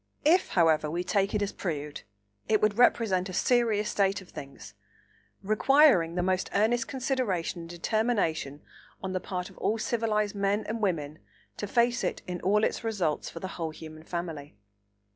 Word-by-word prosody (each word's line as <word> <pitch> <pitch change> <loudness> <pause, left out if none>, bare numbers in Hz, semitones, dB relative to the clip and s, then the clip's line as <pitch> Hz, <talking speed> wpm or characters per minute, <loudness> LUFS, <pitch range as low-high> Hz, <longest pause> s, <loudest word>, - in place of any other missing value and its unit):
If, 350 +5 +4
however, 155 -3 +4
we 170 +3 -2
take 200 +2 0
it 205 - +1
as 200 - -2
proved, 150 -5 -4 0.5
it 215 -1 +4
would 215 +1 +1
represent 195 -6 +3
a - - -6
serious 225 -1 +2
state 195 -1 +1
of 190 - -15
things, 140 -1 -10 0.7
requiring 215 - +4
the 180 - 0
most 185 0 0
earnest 225 +4 +2
consideration 250 -11 -2
and 165 - -10
determination 175 - -1 0.4
on 190 0 -3
the 185 - 0
part 180 -1 -5
of - - -17
all 220 - 0
civilised 215 -2 0
men 200 +1 0
and 225 +1 -3
women 155 -7 -1 0.4
to 205 - -4
face 235 +3 +2
it - - -2
in 180 -1 -5
all 210 +4 +2
its - - 0
results 190 -9 -1
for 165 - -8
the 190 - -5
whole 165 -1 -1
human 155 0 -10
family. 160 -5 -6
195 Hz, 170 wpm, -28 LUFS, 170-220 Hz, 0.7 s, If